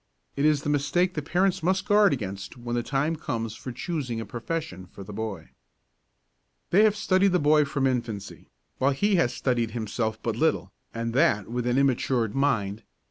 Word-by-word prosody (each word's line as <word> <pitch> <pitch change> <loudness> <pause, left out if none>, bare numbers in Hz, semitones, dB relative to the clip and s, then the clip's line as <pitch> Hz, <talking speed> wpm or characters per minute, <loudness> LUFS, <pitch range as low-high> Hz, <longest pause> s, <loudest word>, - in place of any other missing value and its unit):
This 140 - +1
is 150 -2 +3
the - - -2
mistake 150 +6 +1
that 150 -2 -4
parents 180 +3 +1
must 190 +3 +1
guard 205 -1 +5
against 100 -4 -5
when 120 0 -4
the 120 - +1
time 145 +6 0
comes 115 -7 -4
for 130 - -7
choosing 130 -3 -3
a 115 - -4
profession 115 - -5
for 100 - -11
the 105 +2 -9
boy. 100 -6 -5 1.2
They 200 +5 +6
have 210 -1 +3
studied 195 -2 +2
the 180 - +3
boy 150 0 +4
from 140 -1 -1
infancy, 115 -6 -3 0.3
while 135 +2 +3
he 200 +7 +2
has 140 -8 +2
studied 120 -3 0
himself 110 0 -2
but 115 -2 -1
little, 115 - 0 0.2
and 115 0 -3
that 125 - +2
with 120 0 -2
an 125 +1 +1
immatured 125 -4 +1
mind. 115 -7 0
130 Hz, 185 wpm, -26 LUFS, 115-160 Hz, 1.2 s, They